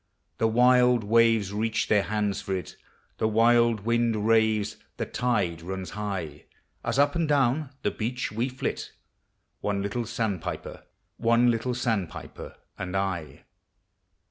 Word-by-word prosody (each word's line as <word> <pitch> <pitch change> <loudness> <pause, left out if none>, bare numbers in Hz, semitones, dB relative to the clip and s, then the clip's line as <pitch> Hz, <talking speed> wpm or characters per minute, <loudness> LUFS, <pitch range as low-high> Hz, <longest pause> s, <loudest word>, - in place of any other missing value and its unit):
The 115 - +3
wild 125 +1 +4
waves 115 -2 +3
reach 110 +1 0
their 105 -2 +4
hands 105 -1 -1
for 95 - -2
it. 90 - -6 0.4
The 110 - +2
wild 115 0 +4
wind 115 -1 +1
raves, 110 -2 +2 0.2
the - - -2
tide 100 -9 -1
runs 95 +2 -5
high, 95 -8 -5 0.4
As - - -1
up 145 0 +4
and 170 -2 0
down 140 0 +2
the - - +1
beach 125 +2 -3
we 115 +5 -1
flit, 130 - -4 0.3
— - - -49
One 100 -1 -1
little 115 +4 -2
sandpiper 105 -6 -4 0.3
and 115 - -1
T. 95 -5 -3
110 Hz, 125 wpm, -27 LUFS, 100-120 Hz, 0.4 s, wild